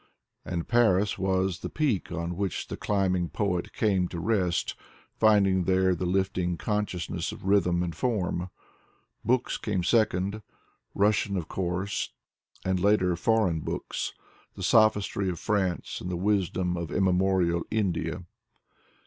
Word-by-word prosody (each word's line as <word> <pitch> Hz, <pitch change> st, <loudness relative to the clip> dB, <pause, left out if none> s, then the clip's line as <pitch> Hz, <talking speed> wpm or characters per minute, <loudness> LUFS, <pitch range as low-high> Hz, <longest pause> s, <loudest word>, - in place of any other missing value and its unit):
And 85 Hz, -2 st, -4 dB
Paris 105 Hz, -5 st, +3 dB
was 95 Hz, -1 st, 0 dB
the -, -, -5 dB
peak 125 Hz, -, -1 dB
on 85 Hz, +1 st, -3 dB
which 95 Hz, -1 st, -3 dB
the -, -, -3 dB
climbing 95 Hz, -4 st, 0 dB
poet 90 Hz, -4 st, -1 dB
came 95 Hz, -4 st, +1 dB
to 85 Hz, -, -6 dB
rest, 90 Hz, -3 st, 0 dB, 0.4 s
finding 100 Hz, -4 st, +3 dB
there 95 Hz, 0 st, +3 dB
the 90 Hz, +1 st, -2 dB
lifting 90 Hz, -1 st, 0 dB
consciousness 90 Hz, -4 st, -2 dB
of -, -, -10 dB
rhythm 90 Hz, -3 st, +3 dB
and 85 Hz, -3 st, -4 dB
form. 90 Hz, -5 st, -1 dB, 0.7 s
Books 125 Hz, +3 st, +1 dB
came 95 Hz, -5 st, -1 dB
second: 105 Hz, 0 st, +1 dB, 0.5 s
Russian, 100 Hz, -1 st, +2 dB
of 85 Hz, -3 st, -3 dB
course, 95 Hz, +2 st, -2 dB, 0.5 s
and 95 Hz, -1 st, +1 dB
later 95 Hz, -2 st, +3 dB
foreign 95 Hz, -3 st, +2 dB
books: -, -, -4 dB, 0.4 s
the 95 Hz, -, -7 dB
sophistry 105 Hz, -2 st, +3 dB
of 90 Hz, -, -3 dB
France 95 Hz, -4 st, -1 dB
and 90 Hz, -, -5 dB
the 90 Hz, -, -2 dB
wisdom 95 Hz, -2 st, 0 dB
of 85 Hz, -1 st, -4 dB
immemorial 95 Hz, -2 st, +2 dB
India. 90 Hz, -5 st, -1 dB
95 Hz, 130 wpm, -27 LUFS, 90-105 Hz, 0.7 s, Paris